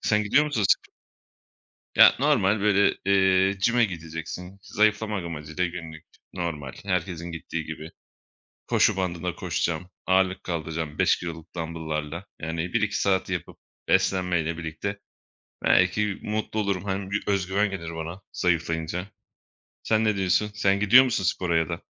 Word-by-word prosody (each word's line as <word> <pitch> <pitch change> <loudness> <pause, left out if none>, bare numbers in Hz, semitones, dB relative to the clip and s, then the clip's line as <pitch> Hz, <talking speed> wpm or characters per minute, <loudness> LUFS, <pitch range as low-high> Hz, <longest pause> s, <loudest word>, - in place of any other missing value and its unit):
Sen 105 0 +2
gidiyor 140 +9 +3
musun 145 -8 -1
spo - - +2 1.0
Ya, - - +8
normal, 100 +2 +3
böyle, 100 -1 +3
eee, 95 0 +4
gym'e 120 +5 +2
gideceksin 85 +1 -6
zayıflamak 105 -2 +1
amacıyla 80 +2 -3
günlük. 80 -2 -8 0.3
Normal, 80 -7 -4
herkesin 90 -3 -2
gittiği 80 0 -5
gibi 80 +1 -7 0.8
koşu 110 - +3
bandında 90 -2 -2
koşacağım. 85 0 -2 0.2
Ağırlık 95 0 +2
kaldıracağım, 80 -2 -4
5 - - +3
kiloluk 80 -2 -8
dambıllarla. 80 0 -4 0.2
Yani, 80 +2 -3
1-2 105 -3 0
saat 95 -1 +1
yapıp - - -4 0.3
beslenmeyle 90 -4 +1
birlikte 85 +5 -5 0.6
belki 95 +3 +2
mutlu 110 0 -2
olurum. 100 -3 -1
Hani, 95 -1 -3
bir 105 - -1
özgüven 100 +1 +1
gelir 85 -4 -6
bana 85 +4 -6
zayıflayınca. 85 +1 -1 0.8
Sen 110 0 +2
ne 110 -2 +2
diyorsun? 95 +2 +1
Sen 100 -1 +2
gidiyor 120 +6 +7
musun 120 -7 -1
spora 85 -1 +1
ya 80 -2 +1
da? - - -5
90 Hz, 135 wpm, -25 LUFS, 80-100 Hz, 1.0 s, Ya